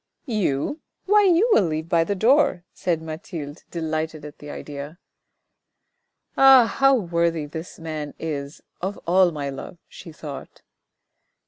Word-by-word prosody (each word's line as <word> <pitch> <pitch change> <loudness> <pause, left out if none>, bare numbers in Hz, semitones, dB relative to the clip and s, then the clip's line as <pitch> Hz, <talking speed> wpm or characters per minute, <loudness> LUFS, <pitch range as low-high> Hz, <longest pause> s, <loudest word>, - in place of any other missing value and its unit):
"You? 215 - -1 0.2
Why 415 +1 +5
you 370 +4 +4
will 205 - +5
leave 155 0 -3
by 170 -2 +3
the 200 +4 -2
door," 230 - +3
said 165 -3 -1
Mathilde, 160 -2 -7
delighted 155 -2 -3
at 150 - -11
the 145 - -10
idea. 145 +2 -7 0.7
" - - -52
Ah! 270 -3 +8
how 270 +4 +3
worthy 170 -6 0
this 160 +3 -8
man 155 -3 -6
is 145 -2 -5 0.2
of 190 +3 -3
all 180 +1 +4
my 145 -3 -4
love," 135 +5 -8
she 175 - -11
thought. 150 -2 -9
165 Hz, 140 wpm, -23 LUFS, 155-205 Hz, 0.7 s, Ah